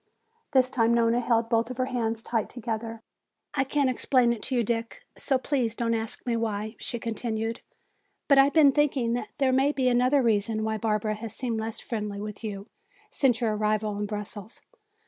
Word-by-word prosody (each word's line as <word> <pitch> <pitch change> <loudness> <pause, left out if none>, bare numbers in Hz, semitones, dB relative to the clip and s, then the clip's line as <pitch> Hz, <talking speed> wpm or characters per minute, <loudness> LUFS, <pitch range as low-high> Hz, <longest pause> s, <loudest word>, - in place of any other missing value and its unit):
This 260 -2 +3
time 235 -2 +3
Nona 230 0 +3
held 230 -1 +1
both 230 +1 0
her 255 - +1
hands 230 -3 -2
tight 225 -3 -1
together. 225 -1 -5 0.5
"I 270 - +2
can't 280 +1 +1
explain 250 -1 +2
to 260 - -2
you, 240 - +2
Dick, 230 +1 -3
so 270 - +1
please 255 -4 -1
don't 230 -1 0
ask 225 -1 -3
me 240 -2 0
why," 220 -1 -2
she 235 - -2
continued. 225 0 -3 0.7
"But 280 -2 +6
I 270 - +8
have 280 - -1
been 300 -4 +6
thinking 270 -5 +1
that 235 -3 -3
there 270 -2 +2
may 270 +2 +3
be 265 -3 0
another 255 +3 +3
reason 220 -1 +1
why 220 0 -1
Barbara 215 -1 0
has 215 0 -6
seemed 235 -4 -2
less 220 0 -4
friendly 210 -3 -4
with 210 +1 -7
you 200 -2 -5 0.5
since 250 -4 +2
your 220 -2 +1
arrival 215 0 0
in 205 - -2
Brussels. 210 +1 -7
230 Hz, 185 wpm, -27 LUFS, 220-255 Hz, 0.7 s, I